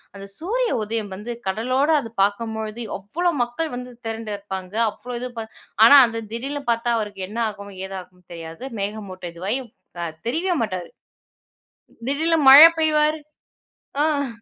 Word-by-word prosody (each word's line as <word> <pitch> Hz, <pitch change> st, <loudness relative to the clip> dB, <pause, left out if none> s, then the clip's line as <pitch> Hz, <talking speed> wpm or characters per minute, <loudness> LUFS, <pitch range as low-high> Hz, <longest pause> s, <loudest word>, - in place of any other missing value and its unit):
அந்த 200 Hz, 0 st, -9 dB
சூரிய 465 Hz, +8 st, -1 dB
உதயம் 215 Hz, -2 st, -3 dB
வந்து 225 Hz, +5 st, -6 dB
கடலோடு 255 Hz, +10 st, +1 dB
அது 225 Hz, -, -9 dB
பாக்கும்பொழுது, 220 Hz, +2 st, -2 dB, 0.2 s
அவ்வளோ 340 Hz, -, -1 dB
மக்கள் 245 Hz, +5 st, -4 dB
வந்து 250 Hz, 0 st, -7 dB, 0.2 s
திரண்டு 225 Hz, -1 st, -4 dB
இருப்பாங்க. 190 Hz, -1 st, -7 dB, 0.2 s
அவ்வளோ 245 Hz, +3 st, -8 dB
இது 250 Hz, -, -4 dB
ப -, -, -3 dB, 0.4 s
ஆனா, 285 Hz, +5 st, +10 dB
அது 230 Hz, 0 st, -4 dB
"திடீர்னு 280 Hz, +5 st, -4 dB
பாத்தா 235 Hz, +1 st, 0 dB
அவருக்கு 205 Hz, -3 st, -5 dB
என்ன 225 Hz, +3 st, -5 dB
ஆகும், 200 Hz, -1 st, -10 dB
ஏதாகும் 180 Hz, -2 st, -10 dB
தெரியாது. 165 Hz, +5 st, -9 dB, 0.2 s
மேகமூட்ட 200 Hz, -3 st, -5 dB
இதுவாயி 195 Hz, +9 st, -2 dB, 0.7 s
தெரியவே 350 Hz, +7 st, 0 dB
மாட்டாரு. 185 Hz, -5 st, -4 dB, 1.2 s
திடீர்ல 320 Hz, +3 st, +2 dB
மழை 295 Hz, +5 st, +12 dB
பெய்வாரு." 305 Hz, 0 st, +2 dB, 0.8 s
ஆங். 285 Hz, -3 st, +1 dB
230 Hz, 135 wpm, -22 LUFS, 200-285 Hz, 1.2 s, மழை